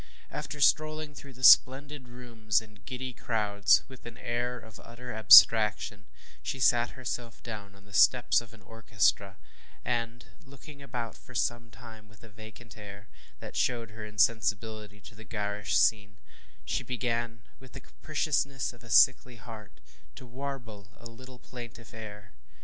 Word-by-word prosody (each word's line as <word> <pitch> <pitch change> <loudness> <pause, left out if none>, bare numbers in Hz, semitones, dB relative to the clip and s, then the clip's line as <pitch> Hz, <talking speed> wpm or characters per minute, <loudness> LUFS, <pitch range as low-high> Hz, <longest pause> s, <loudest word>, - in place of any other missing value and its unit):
After 150 - -6
strolling 155 +1 +1
through 140 -1 -12
the 130 +1 -14
splendid 135 +2 +5
rooms 115 -4 -2
and 105 -2 -17
giddy 130 0 -6
crowd 105 -4 -4 0.2
with 130 -2 -13
an 120 - -11
air 120 +1 -3
of 110 -2 -14
utter 125 +1 -10
abstraction, 105 -2 +6 0.4
she 135 - -5
sat 120 -1 +2
herself 120 -2 -6
down 105 -4 -8
on 100 0 -20
the 100 - -18
steps 125 +4 +4
of 115 -3 -15
an 110 -3 -18
orchestra, 105 -3 -1 0.5
and, 120 0 -3 0.2
looking 140 +2 -14
about 120 -5 -6
for 130 - -16
some 120 +1 -2
time 110 -1 -14
with 110 +1 -21
a 115 - -14
vacant 110 +1 -14
air, 100 0 -12 0.3
that - - -10
showed 115 -3 -1
her 110 0 -10
insensibility 105 0 -1
to 115 - -14
the 110 +1 -13
garish 105 0 -2
scene, 100 -1 +1 0.5
she - - -2
began, 115 -1 -3 0.2
with 130 -2 -16
the - - -8
capriciousness 140 -2 -2
of 120 - -19
a 115 - -14
sickly 125 +2 +4
heart, 110 -2 -12 0.4
to 130 - -11
warble 120 -6 -8
a 120 - -17
little 125 +2 -12
plaintive 120 -2 -11
air. 105 -2 -10
115 Hz, 155 wpm, -29 LUFS, 105-125 Hz, 0.5 s, abstraction